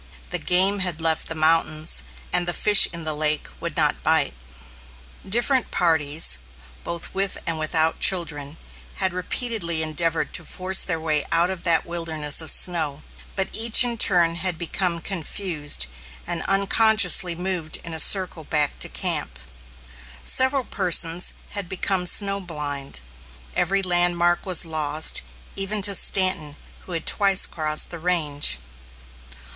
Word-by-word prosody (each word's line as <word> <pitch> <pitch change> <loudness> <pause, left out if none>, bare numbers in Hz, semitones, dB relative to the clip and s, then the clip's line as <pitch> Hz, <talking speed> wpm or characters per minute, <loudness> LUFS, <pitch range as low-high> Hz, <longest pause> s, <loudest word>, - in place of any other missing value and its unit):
The - - -2
game 190 +3 +2
had 180 -3 0
left 160 -1 -2
the 160 - -5
mountains, 155 - +2 0.3
and 175 - 0
the 175 - 0
fish 210 -1 +7
in 170 -1 -8
the 155 -1 -2
lake 150 0 -1
would - - -7
not - - 0
bite. - - 0 1.0
Different 240 +4 0
parties, 150 - +2 0.4
both 170 0 -7
with 195 0 0
and 165 -1 -3
without 160 +1 0
children, 150 -5 0 0.4
had 190 -2 -1
repeatedly 180 -3 -2
endeavored 165 +1 -2
to - - 0
force 185 +1 +1
their 165 -3 -2
way 155 -2 -1
out 170 +2 +1
of 185 -2 -8
that 165 -2 +2
wilderness 160 -3 0
of 160 - -2
snow, 155 -5 +2 0.3
but 190 -1 -3
each 230 +2 +6
in 240 -1 -2
turn 175 -6 +2
had 175 -1 -1
become 170 0 -3
confused, 160 - -2 0.4
and 170 -2 -4
unconsciously 195 -2 +3
moved 175 -3 -3
in 165 - -7
a 160 - -5
circle 185 -1 +3
back 150 -1 -2
to - - +1
camp. - - -3 0.9
Several 260 +1 +3
persons 170 -4 +1 0.2
had 200 -4 -2
become 190 -1 -2
snow 200 +1 +2
blind. 145 - -4 0.5
Every 195 +2 -1
landmark 175 0 0
was 180 -2 +3
lost, 155 -1 +1 0.3
even 195 +1 -4
to 200 0 +6
Stanton, 185 -6 +1 0.3
who 180 - -8
had 165 -1 -5
twice 195 -2 +3
crossed 155 -1 -2
the 170 - -8
range. 150 - 0
170 Hz, 140 wpm, -22 LUFS, 155-190 Hz, 1.0 s, fish